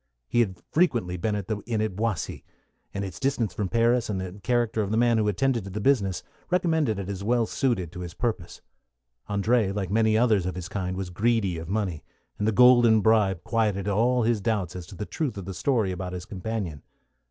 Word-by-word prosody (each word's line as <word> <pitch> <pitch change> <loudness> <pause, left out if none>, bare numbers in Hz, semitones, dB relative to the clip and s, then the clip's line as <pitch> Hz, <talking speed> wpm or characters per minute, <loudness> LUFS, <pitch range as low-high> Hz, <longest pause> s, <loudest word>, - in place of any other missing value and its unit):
He 120 - +1
had 95 -6 +1
frequently 120 - +1
been 105 +4 -1
at 100 -2 -4
the 110 - -1
inn 115 -3 -1
at 110 -3 -1
Boissy, 110 -3 -2 0.5
and 100 0 -3
its 95 -3 -8
distance 130 -8 0
from 100 0 -2
Paris, 115 +1 +2
and 100 -3 -1
the 95 +2 -6
character 120 +1 +1
of 100 - -2
the 110 - 0
man 120 -1 +3
who 105 - +1
attended 120 +2 +1
to - - -6
the 100 +3 -4
business, 100 -7 +1 0.3
recommended 160 - +1
it 100 -2 -4
as 100 -1 -5
well 120 +2 +2
suited 105 -9 -1
to 90 - -9
his 85 -1 -7
purpose. 120 -3 -3 0.7
André, 105 +1 +2
like 100 -2 -3
many 110 0 +3
others 110 -6 +3
of 90 - -3
his 90 0 -6
kind, 95 -2 -3
was 95 -2 -4
greedy 100 -3 +1
of 80 +1 -8
money, 95 -6 -2 0.4
and 105 - 0
the - - +3
golden 120 -1 +6
bribe 100 -5 +3
quieted 105 -4 0
all 120 +5 +2
his 115 -2 +1
doubts 100 -6 -1
as 90 -2 -7
to 100 - -11
the 105 - -5
truth 135 -5 -3
of 95 - -6
the 95 - -5
story 110 0 +1
about 90 0 -5
his 90 -1 -6
companion. 95 -6 -4
105 Hz, 215 wpm, -26 LUFS, 95-115 Hz, 0.7 s, golden